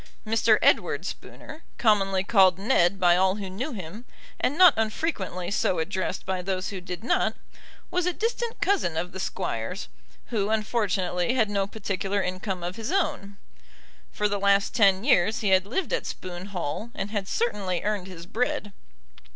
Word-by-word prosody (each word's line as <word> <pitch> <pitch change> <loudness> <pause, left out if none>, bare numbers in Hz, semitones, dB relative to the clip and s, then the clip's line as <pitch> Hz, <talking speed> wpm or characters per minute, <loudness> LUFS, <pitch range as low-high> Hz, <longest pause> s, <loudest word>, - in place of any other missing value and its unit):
Mr. 225 0 +4
Edward - - +3
Spooner, 310 - -8 0.2
commonly 195 -4 +2
called 190 -3 +5
Ned 195 -3 +2
by 175 -2 +5
all 190 +1 +3
who 195 -3 -6
knew 250 +11 -4
him, 200 0 -7 0.4
and 285 - 0
not 360 -4 +8
unfrequently 215 - -2
so 185 - +1
addressed 175 +4 -2
by 185 -1 -2
those 185 0 -2
who 195 -3 -6
did 180 +3 -7
not, 245 - +1 0.6
was 360 0 0
a - - +3
distant 460 +4 -2
cousin 365 - +1
of 180 +2 -2
the 190 - -7
Squire's, 115 - -3 0.4
who 210 -3 0
unfortunately 210 -3 0
had 220 -5 +2
no 200 -1 0
particular 200 -1 -2
income 185 -1 -3
of 180 +3 -4
his 225 +6 -4
own. 300 - -1 0.7
For 210 - 0
the 205 -1 -2
last 200 0 +3
ten 195 -3 +4
years 220 -5 +3
he 205 - +1
had 190 0 +4
lived 270 - -2
at - - -1
Spoon 180 +1 -6
Hall, 185 +2 -4
and 195 +1 -4
had 205 -3 -2
certainly 200 -7 -1
earned 205 -3 -1
his 175 -3 -9
bread. 210 0 -2
200 Hz, 165 wpm, -26 LUFS, 185-225 Hz, 0.7 s, not